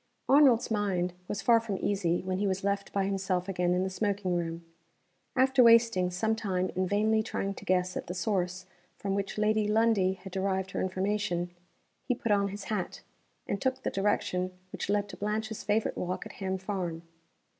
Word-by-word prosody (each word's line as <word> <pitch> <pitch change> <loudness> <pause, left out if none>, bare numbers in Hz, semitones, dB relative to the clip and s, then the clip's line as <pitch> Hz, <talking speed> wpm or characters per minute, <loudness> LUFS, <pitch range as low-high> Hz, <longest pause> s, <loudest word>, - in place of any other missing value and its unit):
ARNOLD'S 265 -5 +5
mind 190 -4 0
was 205 - -3
far 235 -1 +6
from 220 -4 -3
easy 180 -4 0
when 185 0 -2
he 205 - +1
was 190 0 -1
left 200 0 -1
by 195 -1 0
himself 190 -2 -1
again 180 -2 0
in 180 - +1
the 190 - -1
smoking 200 -2 -1
room. 165 -1 -3 0.7
After 260 0 +4
wasting 230 -6 +5
some 220 +5 0
time 185 -4 -1
in 185 0 +1
vainly 215 +3 +2
trying 200 -2 -3
to - - -11
guess 185 0 +1
at - - -4
the 180 - -4
source 180 -1 -1 0.3
from 195 -1 -2
which 200 +1 -2
Lady 215 0 +2
Lundie 215 -3 +3
had 190 0 -11
derived 190 0 -1
her - - -2
information, 185 -2 -1 0.6
he 250 - +2
put 230 - -2
on 200 -1 +3
his 200 +1 -6
hat, 205 -4 -3 0.4
and 200 - -3
took 260 0 -1
the - - -1
direction 185 -2 0
which - - -5
led 205 0 +1
to - - -9
Blanche's 215 +1 -2
favorite 210 +1 +1
walk 180 +1 -3
at - - -8
Ham 190 -1 -3
Farm. 185 -4 -4
195 Hz, 190 wpm, -30 LUFS, 185-215 Hz, 0.7 s, far